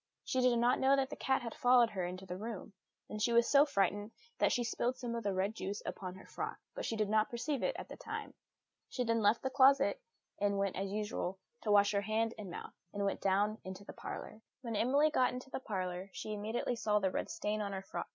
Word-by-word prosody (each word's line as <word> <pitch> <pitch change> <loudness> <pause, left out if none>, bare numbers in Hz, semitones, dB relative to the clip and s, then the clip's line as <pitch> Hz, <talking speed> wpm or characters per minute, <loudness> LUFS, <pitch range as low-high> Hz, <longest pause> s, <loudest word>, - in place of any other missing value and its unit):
She 260 - 0
did 250 -1 +4
not 240 +2 +3
know 270 +1 +5
that 270 -1 0
the - - -4
cat 265 -1 +1
had 230 - -4
followed 245 -2 +5
her 190 -3 -2
into 185 +1 -7
the 180 - -5
room; 215 -2 -6 0.3
and 210 - -5
she 235 - +3
was 235 0 +5
so 285 +1 +6
frightened 205 -3 +1 0.3
that - - +4
she 245 - +1
spilled 240 +2 -1
some 240 -2 -4
of 235 - -2
the 200 - +1
red 190 +2 0
juice 205 -1 -4
upon 185 -1 -5
her 190 - -12
frock, - - -4 0.2
but - - -4
she 225 - -1
did 215 -1 +1
not 215 +1 +2
perceive 260 +3 -2
it - - 0
at - - -6
the - - -9
time. - - -6 0.6
She 250 - -1
then 230 -1 +1
left 215 +2 +3
the 265 - -1
closet, 275 - +5 0.4
and 200 0 +1
went, 195 -1 0
as 195 0 -2
usual, 205 -3 -2 0.2
to 215 - 0
wash 205 0 +6
her 200 -1 +1
hands 220 +2 0
and 205 -3 -6
mouth, 175 - -7 0.2
and 200 0 -2
went 195 - -1
down 205 +3 +2
into 190 +1 -7
the - - -8
parlour. 215 - -7 0.2
When 230 -4 -4
Emily 280 +8 +3
got 255 -4 +3
into 255 +1 -7
the - - -3
parlour, 185 -5 -3
she 215 - -4
immediately 220 +4 -2
saw 210 -2 +2
the 190 -2 +1
red - - -2
stain 210 +5 -2
on 200 -1 -2
her 190 -1 -4
frock. - - -5
215 Hz, 245 wpm, -34 LUFS, 200-245 Hz, 0.6 s, so